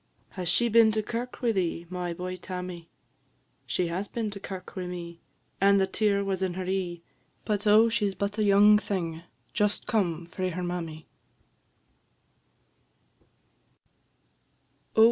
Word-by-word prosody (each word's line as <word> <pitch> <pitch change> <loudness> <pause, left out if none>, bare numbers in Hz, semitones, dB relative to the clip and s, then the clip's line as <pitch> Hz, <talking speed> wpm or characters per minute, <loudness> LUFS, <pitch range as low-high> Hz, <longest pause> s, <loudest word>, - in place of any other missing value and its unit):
"Has 180 -3 -2
she 205 +7 +3
been 230 -1 +6
to 215 0 0
kirk 240 +4 -5
wi' 235 - +3
thee, 175 -4 -1
My 180 0 -3
boy, 180 +2 -4
Tammy?" 180 -2 -7 0.8
"She 120 +10 0
has 180 +4 -2
been 220 -1 -3
to 200 - -6
kirk 190 -2 -8
wi' 185 -2 -4
me, 170 -1 -7 0.4
And 200 0 +5
the 190 - +4
tear 200 +1 +1
was 195 -1 -2
in 185 -2 -1
her 185 0 -3
e'e; 180 -2 -2 0.4
But, 210 -1 -1
oh! 215 +2 +7
she 210 -3 +1
's 195 - -8
but 205 +2 -2
a - - +3
young 205 +1 +6
thing, 170 -6 -3 0.3
Just 210 0 +1
come 175 -7 0
frae 185 +2 -3
her 180 +1 -4
mammy." 165 -3 -4
190 Hz, 145 wpm, -28 LUFS, 175-210 Hz, 0.8 s, oh